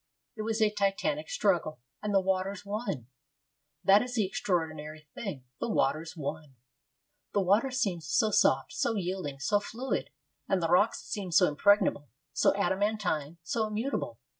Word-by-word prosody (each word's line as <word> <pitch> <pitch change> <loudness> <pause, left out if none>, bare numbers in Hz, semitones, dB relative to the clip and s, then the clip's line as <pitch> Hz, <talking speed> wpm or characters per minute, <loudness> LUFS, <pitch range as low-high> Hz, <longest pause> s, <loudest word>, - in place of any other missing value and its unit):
It 215 - -5
was 220 0 0
a 210 - +3
titanic 210 - 0
struggle, 175 - +1 0.2
and 210 - -2
the 195 - +5
waters 190 +1 -1
won. 200 - -3 0.8
That 200 +1 +6
is 250 0 -4
the 215 -4 +2
extraordinary 155 -5 -3
thing 185 - -5 0.2
the - - -2
waters 165 -2 0
won. 150 -1 -5 0.8
The 205 - +3
water 205 +8 +3
seems 195 -11 -1
so 215 +7 +2
soft, 135 -8 +3
so 230 - 0
yielding, 180 -7 -3
so 205 +9 +2
fluid, 240 +5 -3 0.4
and 195 - +2
the 165 -2 -1
rocks 180 +5 +3
seem 195 -4 -4
so 160 - +6
impregnable, 150 - +3 0.2
so - - +4
adamantine, 195 -6 0
so 220 +6 -1
immutable. 215 - -3
195 Hz, 150 wpm, -30 LUFS, 160-215 Hz, 0.8 s, That